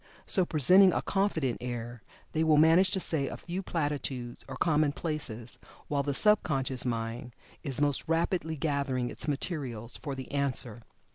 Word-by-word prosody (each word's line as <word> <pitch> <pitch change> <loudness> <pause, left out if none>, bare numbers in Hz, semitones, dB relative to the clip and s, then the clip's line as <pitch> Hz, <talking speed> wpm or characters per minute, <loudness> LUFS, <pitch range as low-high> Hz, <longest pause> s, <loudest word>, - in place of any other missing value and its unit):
So, 185 -3 +4
presenting 180 +6 +6
a - - -1
confident 165 - 0
air, 120 -1 -5 0.3
they 160 - 0
will 155 -2 +4
manage 165 +5 +5
to 190 - 0
say 155 -6 +1
a - - -6
few 180 +2 -5
platitudes 145 -8 -3
or 130 - -7
commonplaces, 145 -6 -1 0.3
while 145 -1 +1
the 140 0 -2
sub 210 +7 +4
conscious 135 -4 -2
mind 115 +1 -4 0.3
is 140 -4 -3
most 145 -2 +1
rapidly 165 -1 0
gathering 140 -4 -1
its - - -2
materials 135 - -4
for 140 -3 -5
the 130 -1 -8
answer. 130 -5 0
145 Hz, 155 wpm, -29 LUFS, 125-160 Hz, 0.3 s, presenting